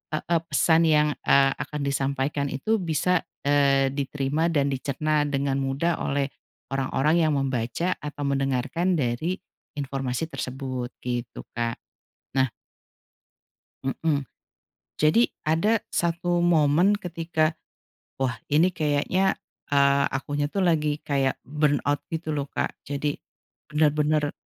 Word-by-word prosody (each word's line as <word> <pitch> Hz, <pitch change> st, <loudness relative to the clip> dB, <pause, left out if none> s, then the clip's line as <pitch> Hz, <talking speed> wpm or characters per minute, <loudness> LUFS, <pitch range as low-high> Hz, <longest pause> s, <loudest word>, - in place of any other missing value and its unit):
heeh, 165 Hz, +1 st, 0 dB
pesan 165 Hz, 0 st, +4 dB
yang, 150 Hz, -1 st, +4 dB, 0.2 s
eee, 135 Hz, 0 st, +6 dB
akan 150 Hz, -1 st, -4 dB
disampaikan 140 Hz, +1 st, -1 dB
itu 205 Hz, +12 st, 0 dB
bisa, 175 Hz, +1 st, +1 dB, 0.2 s
eee, 140 Hz, -1 st, +3 dB
diterima 140 Hz, +3 st, -1 dB
dan 140 Hz, -4 st, +1 dB
dicerna 145 Hz, +3 st, 0 dB
dengan 140 Hz, -1 st, 0 dB
mudah 135 Hz, +6 st, 0 dB
oleh 140 Hz, 0 st, -1 dB, 0.4 s
orang-orang 135 Hz, +3 st, +1 dB
yang 155 Hz, -2 st, +3 dB
membaca 135 Hz, +5 st, -1 dB
atau 145 Hz, -1 st, -6 dB
mendengarkan 140 Hz, +6 st, 0 dB
dari 145 Hz, +6 st, 0 dB, 0.4 s
informasi 135 Hz, +1 st, -3 dB
tersebut 130 Hz, -1 st, -4 dB, 0.2 s
gitu, 120 Hz, -1 st, -4 dB
Kak. 115 Hz, 0 st, -2 dB, 0.6 s
Nah 130 Hz, -3 st, +3 dB, 1.3 s
Mhm, 140 Hz, 0 st, 0 dB, 0.8 s
jadi 155 Hz, +11 st, +4 dB
ada 205 Hz, +8 st, +2 dB
1 175 Hz, +1 st, 0 dB
momen 165 Hz, +3 st, +4 dB
ketika 165 Hz, -2 st, -1 dB, 0.6 s
wah 130 Hz, -3 st, -1 dB
ini 165 Hz, +5 st, +4 dB
kayaknya, 160 Hz, +5 st, +1 dB, 0.3 s
eee, 140 Hz, 0 st, +4 dB
akunya 145 Hz, +2 st, -2 dB
tuh 195 Hz, +3 st, 0 dB
lagi 150 Hz, -3 st, +2 dB
kayak 135 Hz, -2 st, +1 dB
burnout 145 Hz, 0 st, +1 dB
gitu 160 Hz, -1 st, -3 dB
loh, 140 Hz, -1 st, -2 dB
Kak. -, -, -2 dB
Jadi 145 Hz, +1 st, -2 dB, 0.5 s
bener-bener 150 Hz, 0 st, +2 dB
145 Hz, 115 wpm, -25 LUFS, 135-160 Hz, 1.3 s, eee